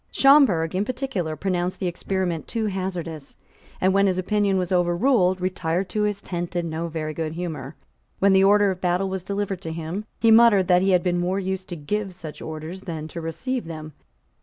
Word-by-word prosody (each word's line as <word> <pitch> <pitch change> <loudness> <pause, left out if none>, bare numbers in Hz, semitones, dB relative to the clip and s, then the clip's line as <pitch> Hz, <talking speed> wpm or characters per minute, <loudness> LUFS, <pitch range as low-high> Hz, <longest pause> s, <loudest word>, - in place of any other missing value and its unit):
Schomberg, 265 - +5
in 190 +2 +1
particular, 230 - -3
pronounced 180 +1 -2
the - - -2
experiment 180 -1 -2
too 225 -2 -2
hazardous, 180 -7 -4 0.4
and, 185 +1 +3
when 195 0 +4
his 185 -1 +1
opinion 200 +1 +1
was 180 -1 -2
overruled, 180 +2 +2
retired 180 0 -1
to 210 +3 -1
his 210 -1 -1
tent 175 -1 -4
in 170 -2 -1
no 165 +2 -3
very 155 -1 -4
good 160 0 -3
humour. 160 -4 -5 0.4
When 200 0 +4
the 190 0 +5
order 205 0 +5
of 185 0 -6
battle 180 +2 +1
was 190 0 -3
delivered 200 0 -3
to 160 - -5
him, 165 +6 -5
he 225 -1 +4
muttered 220 -5 +6
that 180 0 +5
he 195 - +2
had 180 -2 +3
been 175 -1 +1
more 180 +2 0
used 190 0 -4
to 175 - -4
give 190 +5 -3
such 155 -3 -9
orders 160 +4 -6
than 160 -5 -5
to 170 - -6
receive 240 +10 -3
them. 155 -2 -8
185 Hz, 200 wpm, -24 LUFS, 165-195 Hz, 0.4 s, muttered